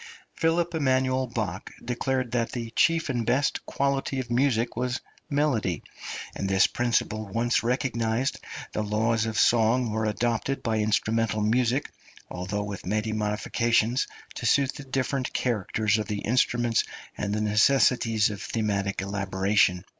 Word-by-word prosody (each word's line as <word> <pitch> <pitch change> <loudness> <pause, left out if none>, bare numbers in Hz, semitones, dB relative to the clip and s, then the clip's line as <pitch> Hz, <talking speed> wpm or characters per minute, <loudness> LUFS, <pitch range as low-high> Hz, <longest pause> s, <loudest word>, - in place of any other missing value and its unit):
Ph. 165 - +2
Eman. 130 -7 +1
Bach 100 -4 -3 0.2
declared 125 0 -1
that 115 -1 -1
the 115 -2 -4
chief 165 +6 +2
and 120 -3 0
best 125 +5 +1
quality 140 -1 -1
of 125 -2 -5
music 120 -2 +1
was 125 +2 -1 0.3
melody, 135 - 0 0.5
and 95 - -3
this 95 -1 +5
principle 115 -3 0
once 115 +4 +1
recognised, 120 0 0 0.3
the - - -1
laws 110 +2 +1
of 110 -2 -3
song 115 +2 +3
were 110 +1 -1
adopted 120 +5 -1
by 110 -2 0
instrumental 110 +1 +1
music, 120 +4 +1 0.4
although 95 +3 -3
with 100 -2 -6
many 110 +3 -1
modifications, 110 +3 +1 0.3
to - - -3
suit 140 -1 +3
the 145 - -8
different 130 0 -2
characters 110 -2 0
of 105 - -3
the 105 -1 -3
instruments 120 0 +2 0.3
and 100 - -3
the 105 - 0
necessities 110 0 +3
of 100 - -7
thematic 100 -3 -1
elaboration. 95 -1 +1
115 Hz, 140 wpm, -26 LUFS, 105-130 Hz, 0.5 s, this